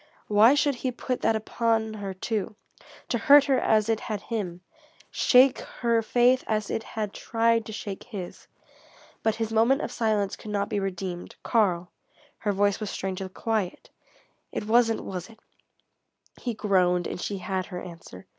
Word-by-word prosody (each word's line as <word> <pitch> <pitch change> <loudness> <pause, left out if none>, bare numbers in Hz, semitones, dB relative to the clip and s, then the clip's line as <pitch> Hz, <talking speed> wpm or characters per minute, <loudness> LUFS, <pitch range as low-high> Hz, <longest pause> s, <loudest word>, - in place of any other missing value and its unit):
Why 215 +6 +6
should 290 0 +2
he 260 - 0
put 250 +1 -3
that 225 - +2
upon 220 0 0
her, 205 -2 -5
too, 210 +2 -3 0.5
to - - -1
hurt 290 -1 +7
her 270 -3 +2
as 215 -1 +2
it 225 -1 +1
had 215 -2 -4
him, 190 -6 -4 0.5
shake 255 +1 +5
her 235 -2 0
faith 245 +3 +3
as 215 -1 -1
it - - -1
had 215 -2 -5
tried 230 0 +1
to - - -6
shake 205 -2 -6
his? 195 -7 -8 0.7
But 220 -1 +1
his 225 -1 -3
moment 230 +5 +3
of - - -4
silence 215 -4 0
could 215 - -10
not 200 -1 -1
be 205 - -1
redeemed. 185 -2 -4
"Karl," 180 -6 +1 0.5
her 210 - 0
voice 200 0 +1
was 215 -2 -4
strangely 190 0 -4
quiet 210 -1 -3 0.6
"it - - -4
wasn't, 225 0 +3
was 180 +1 -6
it?" 225 -1 -17 1.0
He 240 -3 -3
groaned, 180 -4 +2
and - - -5
she 200 - -3
had 185 0 -3
her 180 - -6
answer. 170 - -11
215 Hz, 165 wpm, -26 LUFS, 195-230 Hz, 1.0 s, hurt